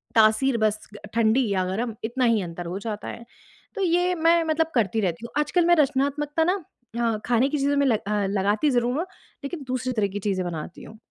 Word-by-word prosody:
तासीर 225 Hz, +4 st, +4 dB
बस 215 Hz, -1 st, +1 dB, 0.3 s
ठंडी 230 Hz, +2 st, +3 dB
या 190 Hz, -2 st, +1 dB
गरम 220 Hz, +5 st, -3 dB
इतना 240 Hz, +3 st, 0 dB
ही 230 Hz, -3 st, +3 dB
अंतर 175 Hz, -1 st, -6 dB
हो 175 Hz, +3 st, -4 dB
जाता 210 Hz, 0 st, -5 dB
है। 235 Hz, -, -7 dB, 0.5 s
तो 400 Hz, -, -3 dB
ये 355 Hz, +1 st, +2 dB
मैं 330 Hz, 0 st, +3 dB
मतलब 320 Hz, 0 st, 0 dB
करती 220 Hz, -2 st, +1 dB
रहती 185 Hz, +2 st, -2 dB
हूँ, -, -, -9 dB
आजकल 335 Hz, +4 st, +1 dB
मैं 345 Hz, 0 st, +5 dB
रचनात्मकता 290 Hz, +1 st, +1 dB
ना 365 Hz, +2 st, 0 dB, 0.4 s
अ, 230 Hz, -2 st, +1 dB
खाने 245 Hz, +3 st, +2 dB
की 300 Hz, -, -1 dB
चीज़ों 285 Hz, +1 st, +1 dB
में 280 Hz, -1 st, +3 dB
अ, 205 Hz, 0 st, -2 dB
लगाती 205 Hz, +8 st, +1 dB
ज़रूर 245 Hz, 0 st, +1 dB
हूँ, 335 Hz, -, -1 dB, 0.4 s
लेकिन 285 Hz, +1 st, -5 dB
दूसरी 255 Hz, 0 st, -2 dB
तरह 215 Hz, -3 st, +1 dB
की 200 Hz, +1 st, -5 dB
चीज़ें 185 Hz, -2 st, -1 dB
बनाती 165 Hz, 0 st, -6 dB
हूँ। 220 Hz, -, -12 dB
235 Hz, 205 wpm, -24 LUFS, 210-295 Hz, 0.5 s, मैं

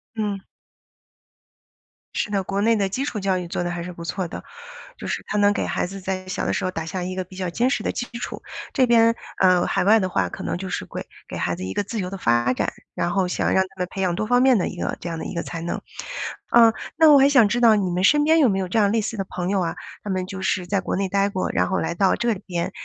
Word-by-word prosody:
嗯。 210 Hz, -3 st, -2 dB, 1.8 s
是 210 Hz, -, -1 dB
的， 200 Hz, -1 st, +1 dB
国 195 Hz, +2 st, -2 dB
内 225 Hz, +2 st, +4 dB
的 200 Hz, -2 st, 0 dB
基 260 Hz, +8 st, -2 dB
础 230 Hz, -7 st, -3 dB
教 190 Hz, -1 st, +1 dB
育 180 Hz, -1 st, -4 dB
做 175 Hz, -, -2 dB
得 175 Hz, -, -2 dB
还 175 Hz, 0 st, -4 dB
是 180 Hz, +1 st, -7 dB
不 170 Hz, -, -9 dB
错 180 Hz, +2 st, -3 dB
的， -, -, -8 dB, 0.5 s
就 -, -, -8 dB
是 -, -, -3 dB
它 210 Hz, -, -1 dB
能 205 Hz, 0 st, +4 dB
给 -, -, -1 dB
孩 -, -, -1 dB
子 195 Hz, +2 st, -7 dB
在 185 Hz, 0 st, -4 dB
小 185 Hz, -, -3 dB
的 -, -, 0 dB
时 195 Hz, -, -1 dB
候 185 Hz, -, -1 dB
打 165 Hz, -3 st, -4 dB
下 180 Hz, +2 st, -4 dB
一 185 Hz, +1 st, -3 dB
个 185 Hz, -, -2 dB
比 185 Hz, +1 st, -15 dB
较 185 Hz, -1 st, -3 dB
坚 240 Hz, +9 st, +1 dB
实 280 Hz, -, -1 dB
的 -, -, 0 dB
基 245 Hz, -, -4 dB
础。 -, -, -5 dB, 0.3 s
这 255 Hz, -, +3 dB
边 230 Hz, -1 st, +5 dB, 0.2 s
呃， 185 Hz, -2 st, +4 dB
海 -, -, +1 dB
外 215 Hz, +4 st, +6 dB
的 185 Hz, -2 st, -1 dB
话， -, -, +1 dB
可 -, -, -7 dB
能 -, -, -2 dB
就 190 Hz, +1 st, -5 dB
是 -, -, -3 dB
会 -, -, -7 dB, 0.2 s
给 -, -, -6 dB
孩 85 Hz, -, -1 dB
子 90 Hz, -, -7 dB
一 95 Hz, +1 st, -4 dB
个 -, -, 0 dB
自 215 Hz, +3 st, -4 dB
由 180 Hz, -2 st, -2 dB
的 195 Hz, -, -6 dB
发 120 Hz, -6 st, +2 dB
展， -, -, -1 dB, 0.2 s
然 175 Hz, -, 0 dB
后 185 Hz, 0 st, +1 dB
想 180 Hz, -, 0 dB
让 190 Hz, -, +4 dB
他 190 Hz, 0 st, -14 dB
们 180 Hz, -, -1 dB
培 195 Hz, -, -4 dB
养 180 Hz, -2 st, +1 dB
多 215 Hz, -, -1 dB
方 245 Hz, +3 st, +3 dB
面 260 Hz, -2 st, +5 dB
的 185 Hz, -, 0 dB
一 -, -, -6 dB
个 -, -, -2 dB
这 -, -, -7 dB
样 165 Hz, -1 st, -4 dB
的 -, -, -5 dB
一 -, -, -6 dB
个 170 Hz, -, -2 dB
才 165 Hz, -, -6 dB
能。 170 Hz, -, -3 dB, 0.7 s
呃， 230 Hz, -1 st, +7 dB, 0.2 s
那 320 Hz, -1 st, +7 dB
我 285 Hz, -, +8 dB
还 275 Hz, +1 st, +6 dB
想 260 Hz, -7 st, +6 dB
知 240 Hz, +4 st, 0 dB
道， 230 Hz, -2 st, +7 dB
你 195 Hz, -3 st, 0 dB
们 180 Hz, +1 st, -1 dB
身 295 Hz, +9 st, +5 dB
边 320 Hz, +2 st, +4 dB
有 275 Hz, -6 st, +5 dB
没 195 Hz, -, 0 dB
有 190 Hz, -, -2 dB
这 200 Hz, +5 st, +1 dB
样 200 Hz, -2 st, +3 dB
类 225 Hz, -, +2 dB
似 225 Hz, +2 st, -3 dB
的 195 Hz, -, -2 dB
朋 180 Hz, 0 st, -3 dB
友 195 Hz, -1 st, +1 dB
啊？ 165 Hz, -2 st, -2 dB, 0.3 s
他 210 Hz, -, -6 dB
们 185 Hz, -1 st, -1 dB
就 190 Hz, +1 st, -7 dB
是 190 Hz, -1 st, 0 dB
在 195 Hz, +2 st, 0 dB
国 -, -, -2 dB
内 195 Hz, 0 st, 0 dB
呆 200 Hz, +1 st, +2 dB
过， 190 Hz, -2 st, -2 dB
然 -, -, +1 dB
后 190 Hz, -, 0 dB
来 -, -, -1 dB
到 190 Hz, +2 st, +3 dB
这 235 Hz, -1 st, +1 dB
里 195 Hz, -, -9 dB
边， 175 Hz, -2 st, -2 dB
190 Hz, 320 characters per minute, -23 LUFS, 180-220 Hz, 1.8 s, 我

